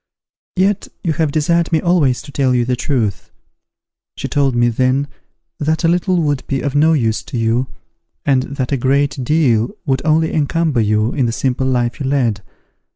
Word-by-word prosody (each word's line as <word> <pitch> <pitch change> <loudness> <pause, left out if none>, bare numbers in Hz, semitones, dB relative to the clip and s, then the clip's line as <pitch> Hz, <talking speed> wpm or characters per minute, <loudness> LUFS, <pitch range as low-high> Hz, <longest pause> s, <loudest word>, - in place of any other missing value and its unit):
Yet 195 +2 +1 0.2
you 165 - 0
have 155 -1 0
desired 165 +3 +1
me 160 - +3
always 155 -8 +1
to 145 - -11
tell 130 -3 +1
you 120 -1 +1
the 125 +1 0
truth. 120 -7 -2 0.9
She - - -4
told 140 -3 +1
me 120 0 +3
then 130 +4 +1 0.5
that 155 +3 0
a - - +4
little 175 0 +1
would 145 -3 -1
be 135 -1 -1
of 140 -2 -2
no 155 +3 +4
use 115 -7 0
to - - -6
you, 115 +3 +1 0.6
and 135 -2 +3 0.2
that 130 -1 -2
a 140 - +1
great 135 +1 0
deal 125 -5 +2 0.2
would 135 -3 0
only 160 +1 +2
encumber 155 -3 +1
you 110 +2 +1
in 130 -4 +1
the - - -1
simple 130 +2 -1
life 120 -1 0
you 135 - -2
led. 120 -7 0
135 Hz, 185 wpm, -17 LUFS, 125-155 Hz, 0.9 s, a